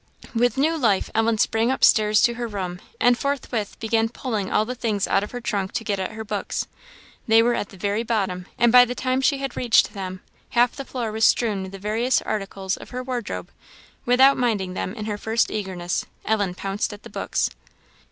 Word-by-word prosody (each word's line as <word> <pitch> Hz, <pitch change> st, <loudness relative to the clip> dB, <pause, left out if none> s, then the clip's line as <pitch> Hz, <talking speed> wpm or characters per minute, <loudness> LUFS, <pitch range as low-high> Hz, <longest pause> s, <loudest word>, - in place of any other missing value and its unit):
With 245 Hz, +2 st, +2 dB
new 310 Hz, +4 st, +2 dB
life 210 Hz, -8 st, +1 dB
Ellen 225 Hz, 0 st, +2 dB
sprang 225 Hz, +2 st, +2 dB
up 265 Hz, -, -1 dB
stairs 215 Hz, -1 st, +5 dB
to 240 Hz, -, +4 dB
her 240 Hz, 0 st, -4 dB
room, 185 Hz, -4 st, -5 dB, 0.2 s
and 245 Hz, 0 st, +5 dB
forthwith 250 Hz, -6 st, -3 dB
began 225 Hz, 0 st, +1 dB
pulling 225 Hz, -5 st, -3 dB
all 215 Hz, -, +2 dB
the 250 Hz, -, -4 dB
things 220 Hz, -5 st, -1 dB
out 195 Hz, -, +2 dB
of 205 Hz, -, -5 dB
her 245 Hz, -, -6 dB
trunk 200 Hz, -5 st, -2 dB
to -, -, -2 dB
get 205 Hz, -3 st, -1 dB
at 190 Hz, +2 st, -3 dB
her 220 Hz, 0 st, -6 dB
books. 220 Hz, -, -3 dB, 0.6 s
They 225 Hz, 0 st, +6 dB
were 240 Hz, +1 st, +2 dB
at 205 Hz, -, -2 dB
the 195 Hz, -, -14 dB
very 205 Hz, +4 st, -1 dB
bottom; 195 Hz, -6 st, -2 dB
and 240 Hz, -1 st, +4 dB
by 250 Hz, 0 st, +9 dB
the 245 Hz, 0 st, -3 dB
time 255 Hz, +1 st, 0 dB
she 280 Hz, +1 st, +3 dB
had 275 Hz, -2 st, -4 dB
reached 240 Hz, -3 st, +3 dB
them, 185 Hz, -2 st, -6 dB, 0.3 s
half 240 Hz, 0 st, +4 dB
the 275 Hz, -, -6 dB
floor 240 Hz, -5 st, -3 dB
was 220 Hz, +1 st, +2 dB
strewn 215 Hz, -5 st, +2 dB
with 190 Hz, 0 st, -6 dB
the 195 Hz, -, -8 dB
various 220 Hz, +6 st, +1 dB
articles 195 Hz, -2 st, -3 dB
of -, -, -11 dB
her 250 Hz, 0 st, -5 dB
wardrobe: 250 Hz, -4 st, -4 dB, 0.5 s
without 265 Hz, +2 st, +5 dB
minding 210 Hz, -7 st, 0 dB
them 185 Hz, +2 st, -4 dB
in 215 Hz, -3 st, -5 dB
her 210 Hz, -1 st, -3 dB
first 225 Hz, +2 st, +1 dB
eagerness, 185 Hz, -4 st, -2 dB, 0.2 s
Ellen 205 Hz, -4 st, 0 dB
pounced 195 Hz, +3 st, -2 dB
at 205 Hz, -, -12 dB
the -, -, -10 dB
books. -, -, -1 dB
220 Hz, 210 wpm, -23 LUFS, 200-245 Hz, 0.6 s, by